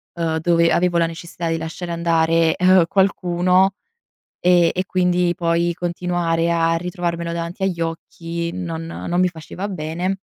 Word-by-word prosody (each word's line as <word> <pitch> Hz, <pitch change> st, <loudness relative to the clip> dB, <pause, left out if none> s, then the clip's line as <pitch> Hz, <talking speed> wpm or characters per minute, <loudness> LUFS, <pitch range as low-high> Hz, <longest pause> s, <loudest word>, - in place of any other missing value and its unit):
ehm, 160 Hz, -1 st, -1 dB
dove 170 Hz, 0 st, +3 dB
avevo 175 Hz, 0 st, +2 dB
la 165 Hz, -, +2 dB
necessità 165 Hz, 0 st, -6 dB
di 165 Hz, -, 0 dB
lasciare 165 Hz, +2 st, -6 dB
andare, 165 Hz, -1 st, +2 dB
ehm, 185 Hz, -1 st, +5 dB
qualcuno, 185 Hz, 0 st, +2 dB, 0.7 s
e 175 Hz, -2 st, +4 dB
e 185 Hz, +1 st, -1 dB
quindi 180 Hz, -1 st, +1 dB
poi 170 Hz, 0 st, +1 dB
continuare 175 Hz, -1 st, -1 dB
a 165 Hz, 0 st, +2 dB
ritrovarmelo 170 Hz, -1 st, -3 dB
davanti 170 Hz, +3 st, -5 dB
agli 175 Hz, -3 st, -1 dB
occhi 165 Hz, +1 st, -4 dB
non 165 Hz, -3 st, -5 dB
non 175 Hz, +1 st, -3 dB
mi 185 Hz, -, +4 dB
faceva 175 Hz, +4 st, -7 dB
bene, 180 Hz, +3 st, -3 dB
170 Hz, 145 wpm, -20 LUFS, 165-180 Hz, 0.7 s, ehm